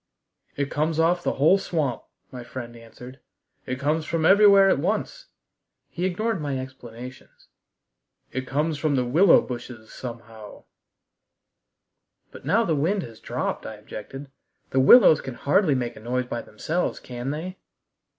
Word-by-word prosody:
"It 140 0 -3
comes 155 +1 -1
off 175 +2 +2
the - - -1
whole 155 +8 +4
swamp," 155 -10 -2 0.3
my 125 -2 -8
friend 120 0 -8
answered. 125 +3 -13 0.5
"It 130 0 -3
comes 150 +3 0
from 160 +1 -1
everywhere 200 +1 +7
at 190 - +3
once." 215 - -2 0.6
He 175 +1 -3
ignored 210 +1 -1
my 140 -2 -2
explanations. 125 -1 -10 0.8
"It 130 0 -4
comes 150 +2 -1
from 150 -2 +1
the 125 -2 +1
willow 165 +9 +5
bushes 120 -3 -8
somehow 115 -4 -10 0.8
" - - -53
"But - - -13
now 225 +3 +2
the 165 - 0
wind 175 +7 0
has 115 -2 -11
dropped," - - -4
I 110 - -7
objected 135 +6 -10 0.4
"The 135 - +2
willows 155 - +7
can 130 -2 -7
hardly 150 +2 +2
make 120 -2 -3
a - - -11
noise 125 +3 -2
by 120 -1 -4
themselves, 160 +11 -3
can 125 +1 -6
they?" 170 +6 -5
140 Hz, 150 wpm, -24 LUFS, 125-170 Hz, 0.8 s, everywhere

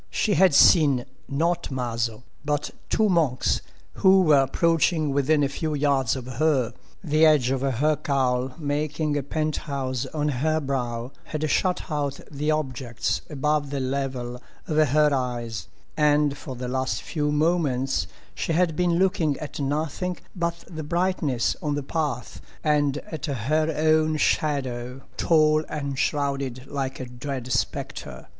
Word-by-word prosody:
She 210 - +1
had 180 -3 +5
seen, 140 -8 +6 0.2
not 170 +5 0
Maso, 120 -3 -2 0.2
but—two 150 +8 -1
monks, 160 -10 +2 0.3
who 190 0 +5
were 150 -4 +5
approaching 160 +2 +2
within 145 +2 +2
a - - +3
few 155 +2 -3
yards 140 -4 +2
of 130 -2 -6
her. 130 -2 +1 0.3
The 155 -2 +2
edge 150 -5 +5
of 135 -1 0
her 140 +3 +2
cowl 130 -3 0
making 150 0 -1
a 145 - +1
pent 155 +2 -2
house 130 -4 -3
on 150 -1 -1
her 155 +4 +1
brow 125 -4 -3
had 155 0 -2
shut 185 -1 +1
out 145 -2 -2
the 150 +1 -2
objects 125 - -1
above 150 0 0
the 140 0 -2
level 130 -2 -3 0.3
of 155 -2 +3
her 150 +2 +3
eyes, 120 -4 -3 0.3
and 150 -2 +3
for 140 -2 -8
the 125 0 -5
last 130 -3 -1
few 150 -2 -1
moments 145 - +1 0.3
she 165 - -2
had 170 -1 +2
been 175 -1 +2
looking 180 -6 +2
at 150 - -7
nothing 155 +5 -2 0.2
but 170 -1 -2
the 160 -3 -6
brightness 160 -6 0
on 150 -2 -1
the 145 - -3
path 145 -4 -3 0.2
and 145 -2 +2
at 160 0 -4
her 150 +5 0
own 155 0 +3
shadow, 130 -5 -1
tall 155 -1 +3
and 140 -3 -3
shrouded 140 -4 -1
like 135 -1 -4
a 130 - -4
dread 125 0 -6
spectre. - - -3
145 Hz, 145 wpm, -25 LUFS, 130-155 Hz, 0.3 s, seen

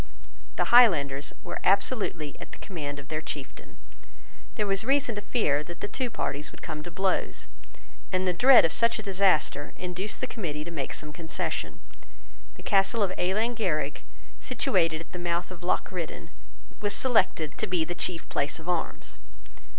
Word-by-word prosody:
The - - 0
Highlanders 145 - +6
were - - -5
absolutely 195 - +1
at - - -10
the - - -7
command 150 -7 -5
of 145 0 -10
their 155 0 -2
chieftain. 145 -3 -8 0.8
There 210 - 0
was 195 0 +1
reason 270 0 +2
to 205 - -4
fear 175 - +1
that 170 +2 -9
the - - -3
two 255 +3 -2
parties 150 -8 -3
would - - -15
come 150 - -4
to 175 - -7
blows; 190 +2 0 0.7
and 185 0 +1
the 180 - +3
dread 250 +6 +8
of 165 - +1
such 230 +4 +3
a 220 - -6
disaster 190 -7 +2
induced 185 +3 -2
the - - -1
Committee 150 -8 -4
to 170 - -7
make 140 -5 -3
some 150 -1 -7
concession. 160 +1 -4 0.7
The - - -13
castle 200 +2 +3
of 190 - +1
Ealan 205 +6 0
Ghierig, 155 -10 -1 0.4
situated 165 -10 +1
at - - -12
the 180 - -6
mouth 175 +1 -1
of 180 -1 -9
Loch 175 - 0
Riddan, 175 -3 -5 0.5
was 205 -1 0
selected 190 - +2
to - - 0
be 180 -3 +1
the 175 - -3
chief 175 -1 -2
place 145 - -1
of 160 - -12
arms. 175 -2 -2
180 Hz, 175 wpm, -28 LUFS, 155-205 Hz, 0.8 s, dread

